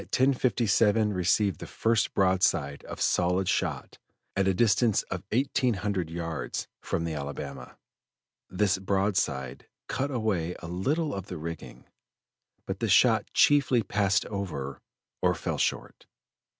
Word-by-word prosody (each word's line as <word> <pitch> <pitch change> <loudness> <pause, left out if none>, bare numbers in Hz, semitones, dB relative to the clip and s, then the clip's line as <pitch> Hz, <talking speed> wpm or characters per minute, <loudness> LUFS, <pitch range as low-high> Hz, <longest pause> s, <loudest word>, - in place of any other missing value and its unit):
57 115 -5 +2
received 95 +1 +1
the - - -7
first 115 -2 0
broadside 90 -7 +1
of - - -8
solid 90 +1 +1
shot - - -2 0.4
at 95 -1 +1
a 95 - +3
distance 110 +1 +3
of 95 -1 -3
eighteen 130 -1 +1
hundred 95 -4 -2
yards 80 -1 -4
from 80 - -2
the 85 -1 -3
Alabama. 70 -2 -6 0.7
This 95 0 +1
broadside 95 -10 -1 0.2
cut 140 +2 -2
away 100 - -1
a 85 - -9
little 140 - -1
of 95 -1 -5
the 90 - -6
rigging, 80 +1 -8 0.8
but - - -4
the - - -1
shot - - +4
chiefly 140 -5 +4
passed 100 0 +1
over 75 -10 -5 0.4
or - - +2
fell - - -3
short. - - -2
95 Hz, 130 wpm, -28 LUFS, 85-110 Hz, 0.8 s, shot